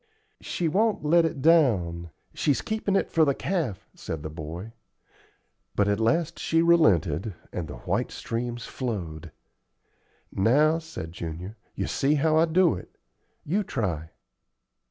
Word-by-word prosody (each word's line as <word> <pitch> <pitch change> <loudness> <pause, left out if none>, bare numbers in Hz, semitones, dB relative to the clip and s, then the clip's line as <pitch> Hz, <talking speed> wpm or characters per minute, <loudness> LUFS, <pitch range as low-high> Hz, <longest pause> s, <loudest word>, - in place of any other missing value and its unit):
"She 170 - -2
won't 205 0 +1
let 165 +2 +5
it 160 -4 -3
down 95 - +3 0.2
she's 135 -7 +1
keepin' 215 -2 -1
it - - +1
for 165 - +4
the 140 -3 +2
calf," 160 - -2
said 80 -3 -6
the 80 - -5
boy. 80 +8 -7 1.0
But 100 - +2
at 100 +1 +1
last 165 +9 +1
she 165 +1 +2
relented, 105 - +3 0.2
and 85 -3 -3
the 75 - -7
white - - 0
streams 120 0 -4
flowed. 90 - -5 1.0
"Now," 150 +11 +3
said 160 - -8
Junior 85 +1 -6
to - - -11
me, 110 - -35
"you - - -2
see 140 +2 +1
how 155 +2 +2
I 160 - +5
do 170 +1 +3
it. - - -9 0.5
You 190 +8 +1
try." 85 - -3
125 Hz, 150 wpm, -26 LUFS, -, 1.0 s, let